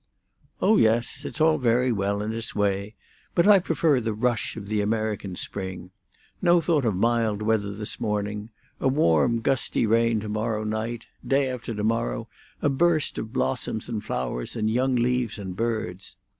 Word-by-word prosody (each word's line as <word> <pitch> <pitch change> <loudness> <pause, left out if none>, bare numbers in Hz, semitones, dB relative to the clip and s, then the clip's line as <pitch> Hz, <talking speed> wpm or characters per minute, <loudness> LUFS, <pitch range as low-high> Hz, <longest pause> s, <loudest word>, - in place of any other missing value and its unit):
"Oh 220 - +5
yes, 120 +5 +1
it's - - -6
very 125 -6 +3
well 100 -1 -1
in 110 +1 -3
its 115 0 -5
way; 100 +1 0 0.4
but 170 - +4
I 205 -1 +8
prefer 160 -6 +2
the 110 -2 -2
rush 120 0 0
of 100 -3 -7
the 105 0 0
American 105 -3 -2
spring; 95 -1 -4 0.5
no 175 -1 +5
thought 160 -5 +1
of 110 -4 +1
mild 110 0 +1
weather 105 -2 +1
this 105 0 -3
morning; 105 0 -2 0.3
a - - +1
warm, 115 - +3
gusty 130 -1 +1
rain 115 0 +3
to 105 - -6
morrow 110 +1 -1
night; 110 +2 -3 0.2
day 135 -1 +1
after 120 -2 -5
to 105 - -3
morrow 105 - -1 0.4
a - - +4
burst 160 +2 +2
of 110 - -6
blossoms 120 -4 -2
and 110 -3 -4
flowers - - -3
and 110 -1 0
young 130 +2 +1
leaves 125 -2 0
and 95 -3 -6
birds. 110 -4 -3
110 Hz, 170 wpm, -25 LUFS, 105-125 Hz, 0.5 s, I